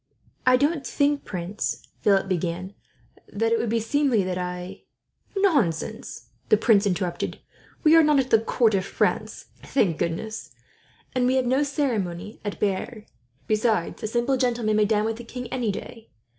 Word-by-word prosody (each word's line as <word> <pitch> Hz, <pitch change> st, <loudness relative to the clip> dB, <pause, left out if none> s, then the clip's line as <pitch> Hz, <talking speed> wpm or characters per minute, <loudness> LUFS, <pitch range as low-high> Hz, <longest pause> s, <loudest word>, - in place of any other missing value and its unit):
"I 255 Hz, 0 st, +7 dB
don't 290 Hz, +2 st, +1 dB
think, 285 Hz, 0 st, 0 dB
Prince," 185 Hz, +2 st, -4 dB
Philip 195 Hz, -2 st, +3 dB
began, 180 Hz, +1 st, -2 dB, 0.6 s
"that 225 Hz, +2 st, 0 dB
it 230 Hz, -, +3 dB
would 235 Hz, -, -1 dB
be 230 Hz, +1 st, +1 dB
seemly 245 Hz, -1 st, +2 dB
that 185 Hz, 0 st, -2 dB
I 180 Hz, 0 st, -5 dB, 0.3 s
" -, -, -16 dB, 0.2 s
"Nonsense," 220 Hz, -, -2 dB, 0.2 s
the 215 Hz, -, +6 dB
prince 205 Hz, -2 st, +4 dB
interrupted, 180 Hz, -2 st, -2 dB, 0.5 s
"we 310 Hz, +1 st, +6 dB
are 330 Hz, -, +8 dB
not 300 Hz, -2 st, +4 dB
at 260 Hz, -1 st, -1 dB
the 225 Hz, -, +6 dB
court 225 Hz, 0 st, +2 dB
of 190 Hz, -1 st, +1 dB
France, 195 Hz, -, -1 dB, 0.2 s
thank 185 Hz, -, 0 dB
goodness, 215 Hz, +7 st, -4 dB, 0.6 s
and 250 Hz, -1 st, +2 dB
we 255 Hz, -, +2 dB
have 260 Hz, -1 st, +2 dB
no 260 Hz, +3 st, +2 dB
ceremony 225 Hz, -, -2 dB
at 205 Hz, -1 st, -4 dB
Bearn. 210 Hz, +3 st, -2 dB, 0.4 s
Besides, 215 Hz, -4 st, 0 dB
a -, -, -2 dB
simple 240 Hz, +4 st, +1 dB
gentleman 235 Hz, -4 st, +1 dB
may 210 Hz, -, +4 dB
dine 210 Hz, 0 st, +1 dB
with 225 Hz, 0 st, -2 dB
the 240 Hz, -, -8 dB
king, 250 Hz, +1 st, -7 dB
any 240 Hz, -5 st, 0 dB
day. 225 Hz, +3 st, -9 dB
220 Hz, 170 wpm, -25 LUFS, 195-255 Hz, 0.6 s, are